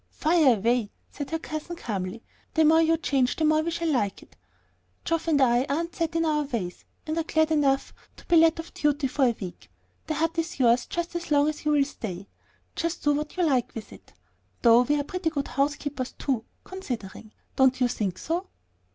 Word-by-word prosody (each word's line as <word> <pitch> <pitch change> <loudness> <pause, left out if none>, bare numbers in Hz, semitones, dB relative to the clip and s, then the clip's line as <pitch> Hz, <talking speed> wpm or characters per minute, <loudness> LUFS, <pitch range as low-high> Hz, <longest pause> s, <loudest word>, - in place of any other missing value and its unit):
"Fire 310 -6 +3
away!" 230 +1 +1 0.2
said 285 -2 -6
her 325 - -1
cousin, 315 +2 -6
calmly. 205 - -4 0.3
"The 320 -1 +5
more 320 +1 +6
you 325 0 +3
change 270 -5 +1
the 315 - 0
more 310 0 +4
we 330 - -2
shall 335 -1 -1
like 205 -8 -1
it. - - -22 0.7
Geoff 330 0 -1
and 305 -3 +3
I 245 -2 +4
aren't 330 +4 -2
set 330 -1 -2
in 330 0 +2
our 305 -1 +1
ways, 215 -10 -5 0.2
and 310 - -2
are - - 0
glad 315 0 +1
enough 275 -3 +1 0.2
to - - -15
be 345 - +3
let 325 0 +5
off 330 - -8
duty 295 -1 0
for 270 +1 +1
a 235 -2 +2
week. 185 -3 -8 0.4
The 310 - -1
hut 330 +2 0
is 330 -3 -3
yours 240 -1 +3
just 345 0 -4
as 345 0 -4
long 290 0 +4
as 305 0 -6
you 300 - +3
will 285 -2 +4
stay; 220 -9 -6
do 190 +3 -10 0.5
just 335 -1 -3
what 295 +3 0
you 360 - +2
like 260 -6 +1
with 225 - -8
it. - - -17 0.5
Though 235 0 +7
we're 290 +3 +1
pretty 360 +3 -2
good 285 -3 -3
housekeepers 280 -2 -2
too, 255 -5 -2 0.2
considering; 235 - -7 0.2
don't 265 -1 +4
you 250 - +3
think 195 -6 -2
so?" 345 +4 -3
295 Hz, 205 wpm, -26 LUFS, 250-325 Hz, 0.7 s, Though